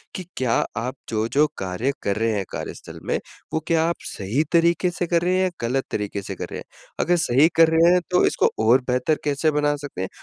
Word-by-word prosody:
कि, 185 - -5
क्या 125 -3 +1 0.2
आप 125 +3 -3
जो-जो 115 +7 +2
कार्य 95 +8 -2
कर 100 - 0
रहे 115 +1 +1
हैं 100 -2 -1
कार्यस्थल - - -7
में - - 0 0.4
वो 160 - +1
क्या 165 -1 +3
आप 170 - -1 0.2
सही 105 +10 -1
तरीके 170 +2 +3
से 175 +1 -3
कर 170 0 +2
रहे 180 +1 +2
हैं 185 - +2
या 185 - +2 0.2
गलत 135 +2 0
तरीके 100 -1 -3
से 95 - -6
कर - - -5
रहे - - -5
हैं? - - -10 0.3
अगर 175 - +3
सही 145 -1 +4
कर 165 -1 +6
रहे 165 +2 +5
हैं 180 - +3
तो 180 - +4
इसको - - +2 0.2
और 125 +4 +6
बेहतर 125 +5 +1
कैसे 150 +2 +1
बना 145 0 +1
सकते 140 - -7
हैं 95 - -2
145 Hz, 230 wpm, -23 LUFS, 115-165 Hz, 0.4 s, कर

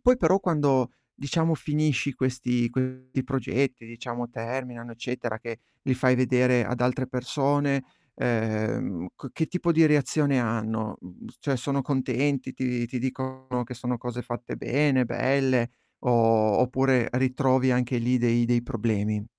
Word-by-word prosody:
poi 250 0 +5
però 195 -5 +3
quando 140 -8 +2 0.2
diciamo 160 +3 0
finisci 150 -3 0
questi 125 -2 0
questi 130 +1 -2
progetti, 135 -2 -1
diciamo 120 +1 -6
terminano, 120 0 -5
eccetera 120 -1 -4
che 115 0 -7 0.2
li 135 - 0
fai 130 0 +3
vedere 125 -1 +3
ad 125 +3 -3
altre 125 +1 +1
persone, 140 +3 0 0.3
ehm, 110 -6 -1
ch - - -10
che 160 - -1
tipo 175 -1 0
di 165 0 +5
reazione 145 -2 +3
hanno? 110 -2 -2
Mhmm, 90 0 -13
cioè, 135 -3 -1
sono 140 +2 -1
contenti, 130 0 0
ti 125 -2 -1
ti 125 +2 -4
dicono 130 0 -3
che 125 +1 -8
sono 125 0 -3
cose 125 0 -5
fatte 120 0 -6
bene, 135 -1 +2
belle, 130 -1 +1 0.4
o 125 - +2
o 115 -3 +4
oppure 130 -1 +2
ritrovi 130 +1 +2
anche 125 0 +1
lì 125 +2 +2
dei 120 0 +3
dei 120 0 +2
problemi? 105 -3 -1
125 Hz, 145 wpm, -26 LUFS, 120-135 Hz, 0.4 s, poi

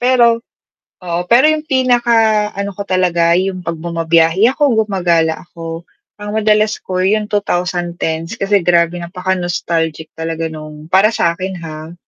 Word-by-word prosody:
Pero, 240 -2 +3 0.6
oo, 175 -1 -2
pero 250 +5 +6
yung 310 0 +1
pinaka 235 -6 +2
ano 200 0 -3
ko 200 - -5
talaga, 175 -3 +2
yung 185 -1 -2
'pag 170 -1 -4
bumabiyahe 165 +4 +2
ako, 295 - -5 0.2
gumagala 170 -5 0
ako, 165 -1 -8 0.3
ang 205 0 -6
madalas 215 0 +2
ko 185 -1 -4
yung 210 +3 +1
2010's 175 -4 -2
kasi 200 -1 +1
grabe 175 -1 +2
napaka 180 +2 -3
nostalgic 165 -2 -2
talaga 165 0 -3
nung 155 0 -10
para 205 +4 +4
sakin, 185 +2 -1
ha. 155 +1 -8
180 Hz, 140 wpm, -16 LUFS, 165-210 Hz, 0.6 s, pero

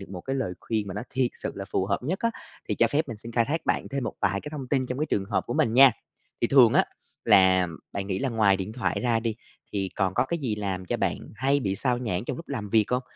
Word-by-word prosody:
được 100 - -10
một 90 -1 -7
cái 135 +8 -3
lời 115 -9 -2
khuyên 110 -3 -2
mà 95 - -5
nó - - -3
thiệt 130 -1 +1
sự - - -5
là - - -5
phù 95 - -1
hợp 100 0 0
nhất 165 +9 -2
á, 230 - +1 0.4
thì - - +1
cho - - +4
phép 150 +1 0
mình 115 - -5
xin 115 +2 -10
khai 115 0 +3
thác 155 +7 -3
bạn - - 0
thêm 140 -1 -3
một - - -3
vài 100 -1 +1
cái - - -7
thông 145 -4 -6
tin 130 -2 +1
trong 125 +1 -4
cái 155 - 0
trường 100 -9 0
hợp 100 - -1
của 120 - -3
mình 110 - +2
nha. 135 +1 +9 0.5
Thì - - +3
thường 125 -3 +6
á, - - +5 0.4
là 95 -1 +5 0.3
bạn 100 -1 -3
nghĩ 95 -2 -2
là 135 - -1
ngoài 110 -5 +3
điện 95 +2 -5
thoại 125 - -1
ra 120 -2 +1
đi, 115 -1 -2 0.4
thì 95 -2 -1
còn 95 -2 0
có - - +3
cái 170 +5 -2
gì 125 -8 -1
làm 95 -3 -3
cho - - -1
bạn - - 0 0.2
hay 135 +5 +1
bị 100 -5 -1
xao 125 +3 0
nhãng 100 -6 -2
trong - - -3
lúc 165 - -10
làm 115 -7 -4
việc 110 +1 +4
hông? 125 +1 +1
115 Hz, 290 wpm, -26 LUFS, 100-130 Hz, 0.5 s, nha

